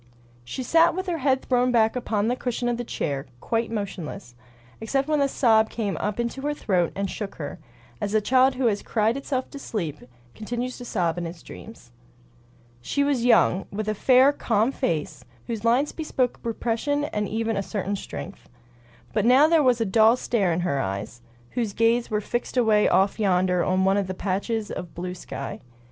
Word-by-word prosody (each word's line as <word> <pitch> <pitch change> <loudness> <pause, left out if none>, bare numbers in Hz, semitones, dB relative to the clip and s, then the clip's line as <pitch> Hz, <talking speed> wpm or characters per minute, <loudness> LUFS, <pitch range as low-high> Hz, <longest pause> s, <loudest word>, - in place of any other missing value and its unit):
She 190 - -5
sat 330 +6 +4
with 375 0 -3
her 345 -3 -2
head 265 -1 +1
thrown 250 0 +2
back 225 -1 +3
upon 220 -4 -1
the 245 - +1
cushion 245 -1 -2
of 240 -1 0
the 245 - -3
chair, 140 - -3
quite 230 - -1
motionless, 195 - -5 0.5
except 270 +5 -1
when 305 -2 +2
a 280 - +3
sob 220 -5 +3
came 210 -4 -2
up 210 +2 -3
into 235 +3 -2
her 295 +1 -1
throat 180 - 0
and 200 0 -1
shook 200 +1 -6
her, 145 +2 -6 0.4
as 205 +1 -1
a - - +6
child 255 +4 +3
who 255 0 -1
has 210 -3 +1
cried 220 +1 +1
itself 270 -1 -3
to 280 - -8
sleep 165 - -4 0.3
continues 240 +3 -4
to 245 - -8
sob 175 -6 -1
in 175 - -3
its 165 0 -10
dreams. 220 - -12 0.9
She 280 - 0
was 275 -4 +1
young, 195 -5 +4
with 215 +1 -4
a 215 - +1
fair, 260 +6 +5
calm 225 -2 +1
face, 155 - -2 0.2
whose 225 -2 -4
lines 245 +5 +2
bespoke 265 -6 -2
repression 235 +5 -1
and 210 -8 -2
even 225 0 -1
a 200 - 0
certain 200 0 -3
strength. 195 0 -8 0.6
But 210 - +1
now 260 +5 +6
there 325 -1 +4
was 250 -4 +3
a 225 - +1
dull 220 +3 +5
stare 205 -8 0
in 165 +2 0
her 155 -6 0
eyes, 100 +5 -5 0.3
whose 230 -5 -2
gaze 230 +2 +2
was 210 -1 -1
fixed 240 +3 -3
away 220 -4 +4
off 195 +3 +2
yonder 180 -3 +2
on 185 0 +1
one 195 +1 +3
of 200 -2 0
those 185 0 -5
patches 210 +3 -2
of 175 - -7
blue 180 +1 -4
sky. 140 -6 -7
225 Hz, 195 wpm, -25 LUFS, 195-250 Hz, 0.9 s, a